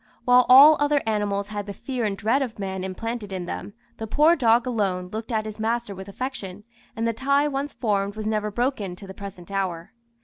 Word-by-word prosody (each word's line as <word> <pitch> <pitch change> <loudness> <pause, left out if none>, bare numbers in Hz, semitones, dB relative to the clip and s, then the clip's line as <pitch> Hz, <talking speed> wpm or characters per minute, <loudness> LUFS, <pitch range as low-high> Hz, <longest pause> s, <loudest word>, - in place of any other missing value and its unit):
While 250 -1 +5
all 285 +4 +9
other 290 -1 +2
animals 205 -2 -1
had 205 -1 -5
the 200 - -6
fear 245 -1 -3
and 200 -2 -2
dread 230 +7 +1
of 245 -4 -4
man 190 -2 -4
implanted 210 +2 -5
in 185 -2 -4
them, 200 - -6 0.2
the 220 - -5
poor 305 +9 +4
dog 235 -4 +3
alone 195 -7 -1
looked 225 +3 -5
at 215 -1 0
his 215 0 -7
master 230 -1 -1
with 190 0 -9
affection, 210 -4 -6 0.3
and 225 +1 -1
the 230 - 0
tie 280 +5 +2
once 280 0 -3
formed 205 -4 -1
was 215 0 -5
never 215 -1 -1
broken 215 -4 -2
to 195 - -11
the 190 - -9
present 195 -2 -10
hour. 185 -4 -3
215 Hz, 210 wpm, -24 LUFS, 200-250 Hz, 0.3 s, all